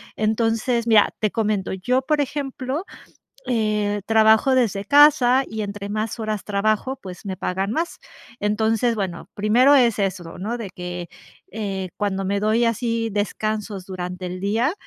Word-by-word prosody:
Entonces 225 +2 0
mira, 215 -2 +5
te 215 - +1
comento 210 -4 -1
yo, 245 +8 0
por 300 +2 0
ejemplo, 280 +1 -3 0.6
eh, 210 -3 0
trabajo 220 +4 +4
desde 205 -5 +1
casa 280 -2 +6
y 220 -1 -5
entre 200 0 -6
más 215 +2 -2
horas 215 -2 -3
trabajo, 215 +5 0
pues 185 +1 -10
me 190 -2 -3
pagan 190 +2 -2
más. 330 +7 -2 0.4
Entonces 220 +3 +1
bueno, 190 -5 -4
primero 240 +7 +4
es 240 -5 +3
eso, 185 -4 -3
¿no? 220 +6 -3
De 220 -5 -6
que, 180 -1 -6 0.4
eh 195 -3 -4
cuando 195 -2 -1
me 200 +1 0
doy 215 +3 +2
así 230 0 0
descansos 210 -1 -3
durante 180 -1 -5
el 180 +1 -6
día, 225 - +1
215 Hz, 150 wpm, -22 LUFS, 195-235 Hz, 0.6 s, casa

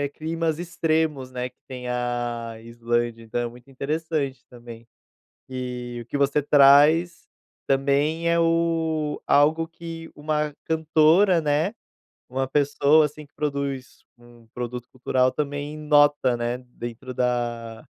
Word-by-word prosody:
climas 160 0 -2
extremos, 160 -5 -1
né, 125 0 -4
que 125 - -39
tem 125 -2 -7
a 120 -1 -2
a 110 - -12
Islândia, 115 0 -2
então 115 +2 -3
é 120 - -1
muito 125 +3 -14
interessante 140 -1 -3
também. 120 -1 -12 0.6
E 125 -1 -5
o - - -16
que 145 - -3
você 140 +1 +2
traz, 145 +5 +5 0.4
também, 140 +5 +1
é 170 0 +3
o 165 -2 0
algo 160 +3 +3
que 165 -1 -9
uma 150 0 -1
cantora, 160 +3 +4
né, 150 +6 +1 0.6
uma 130 +1 -2
pessoa, 145 +2 +4
assim, 150 +1 -5
que - - -38
produz 140 -3 -4 0.2
um 120 -1 -18
produto 125 0 -5
cultural 130 0 +1
também 145 +1 -4
nota, 145 -4 +3
né, 120 +1 -2
dentro 125 0 -8
da 120 -2 -2
140 Hz, 130 wpm, -24 LUFS, 125-155 Hz, 0.6 s, traz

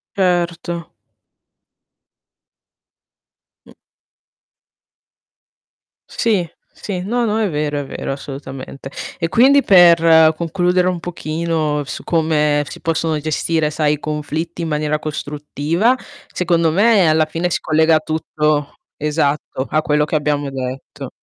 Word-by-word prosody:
Certo. 175 -2 -1 2.7
Mh. - - -16 2.4
Sì, 200 -8 0 0.2
sì, 185 -3 -5
no, 235 +5 -1
no, 215 0 0
è 210 - +1
vero, 150 -1 -2
è 140 - -4
vero, 135 - -4
assolutamente. 135 -1 -8 0.3
E 165 - 0
quindi 270 +9 +5
per 165 -5 +6
concludere 180 +2 +1
un 180 -2 -1
pochino 160 -3 -2
su 140 - -7
come 150 -3 +1
si - - -10
possono 165 -1 -1
gestire, 155 +1 0
sai, 150 -1 +1
i 150 - -4
conflitti 155 +3 -4
in 165 - -3
maniera 150 0 -1
costruttiva, 155 - -1 0.4
secondo 170 -3 +1
me 200 -2 +4
alla 155 0 +3
fine 165 +3 -2
si - - -1
collega 160 0 +3
tutto 150 -2 -1 0.2
esatto, 145 -3 -1
a 155 - +1
quello 150 0 +1
che 155 - -3
abbiamo 145 -1 0
detto. 130 0 -6
160 Hz, 115 wpm, -18 LUFS, 150-175 Hz, 2.7 s, per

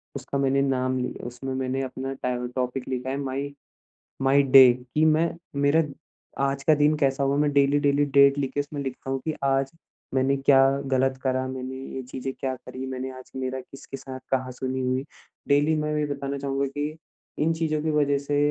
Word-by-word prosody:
उसका 140 +1 -4
मैंने 135 0 +2
नाम 130 -1 0
लि 125 - -2
उसमें 125 +2 -5
मैंने 130 0 -1
अपना 130 +1 -4
टाए 125 -2 -3
टॉपिक 125 0 -2
लिखा 130 0 -3
है 135 - -2
माई 140 +1 -3 0.7
माई 135 +1 +5
डे 130 -2 +8 0.2
कि 155 - +4
मैं 160 +1 +3 0.3
मेरा 145 +3 +4 0.6
आज 140 0 -1
का 155 - +6
दिन 150 +1 +3
कैसा 135 -1 +1
हुआ 135 +1 +1
मैं 145 0 +2
डेली-डेली 140 0 +3
डेट 140 0 +5
लिख 135 -2 -1
के 145 - +1
उसमें 145 0 -4
लिखता 135 0 -5
हूँ 135 0 -1
कि, 155 - -1
आज 135 0 +1 0.4
मैंने 135 +1 +2
क्या 135 0 +5 0.3
ग़लत 135 0 +1
करा, 130 -1 0
मैंने 130 0 -5 0.2
ये 130 - -4
चीज़ें 130 +1 -5
क्या 130 -1 -1
करी, 130 +1 -8
मैंने 130 0 -4
आज 130 - -14
मेरा 130 0 -3
किसके 135 +1 -10
साथ 130 0 -8
कहाँ 130 -1 0
सुनी 130 +1 -3
हुई। 130 +1 0 0.4
डेली 145 +2 +4
मैं 150 0 -1
ये 150 - +1
बताना 140 -1 -4
चाहूँगा 140 0 -1
कि 145 +3 -4 0.5
इन 160 +2 +3
चीज़ों 160 -2 -1
की 160 - 0
वजह 145 -2 +2
से 140 +1 -2
135 Hz, 195 wpm, -25 LUFS, 130-140 Hz, 0.7 s, डे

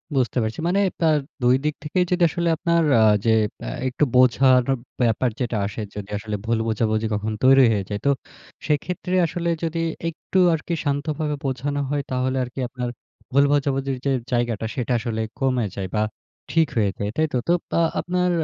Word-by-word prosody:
বুঝতে 130 -1 +1
পারছি। 110 0 -3
মানে 190 +3 +2 0.2
তার 160 -2 +4 0.3
২ 125 +1 +5
দিক 150 - +1
থেকেই 180 +4 +1
যদি 180 -1 +2
আসলে 170 +2 -1
আপনার 170 0 +2 0.2
আ - - +6 0.2
যে, 115 - +4 0.4
আ - - -2 0.2
একটু 130 +3 0
বোঝানোর 125 0 +5 0.3
ব্যাপার 120 +1 +2
যেটা 120 -3 -1
আসে, 100 +2 -5
যদি 105 -1 -6
আসলে 105 0 -4
ভুল 115 0 +1
বোঝাবুঝি 110 0 0
কখনো 105 +1 -2
তৈরি 135 0 +7
হয়ে 105 -3 0
যায়। 105 -1 -3
তো, 140 - +5 0.6
সেক্ষেত্রে 180 +4 -1
আসলে 170 +1 -2
যদি 165 0 -1 0.3
একটু 170 +3 -2
আরকি 160 +2 -3
শান্তভাবে 150 +1 -1
বোঝানো 140 +2 -1
হয়, 145 0 0
তাহলে 130 +1 0
আরকি 125 +2 -7
আপনার 125 0 -4 0.4
ভুল 140 +2 +5
বোঝাবুঝির 135 -2 0
যে, 140 - +2 0.2
জায়গাটা, 120 -3 0
সেটা 125 0 -1
আসলে 110 -1 -3 0.2
কমে 130 -4 +1
যায় 95 -1 -3
বা, 105 - +2 0.5
ঠিক 165 -1 +3
হয়ে 105 -3 +2
যায়, 100 - -2
তাই 155 0 +2
তো? - - +2
তো, 170 - +4 0.3
আ - - +4 0.2
আপনার 180 0 0
130 Hz, 180 wpm, -23 LUFS, 115-155 Hz, 0.6 s, তৈরি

